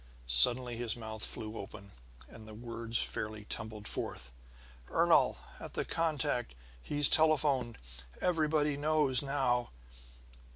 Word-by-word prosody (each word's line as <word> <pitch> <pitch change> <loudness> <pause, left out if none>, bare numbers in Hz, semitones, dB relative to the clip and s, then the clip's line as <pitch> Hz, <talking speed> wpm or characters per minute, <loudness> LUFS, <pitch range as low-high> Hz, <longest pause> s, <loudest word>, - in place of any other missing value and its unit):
Suddenly 120 - +4
his 120 -2 0
mouth 110 -2 -4
flew 110 0 -3
open, 100 0 -10 0.4
and 110 -1 -13
the 110 - -10
words 115 0 -3
fairly 105 -1 -3
tumbled 105 0 -6
forth: - - -4 0.6
"Ernol - - +3 0.2
at - - -9
the - - -2
contact 145 - -1 0.3
he's 145 - +4
telephoned! 145 -7 +2 0.4
Everybody 155 -4 +1
knows 150 -3 +3
now!" 135 -4 0
120 Hz, 115 wpm, -32 LUFS, 110-145 Hz, 0.6 s, Suddenly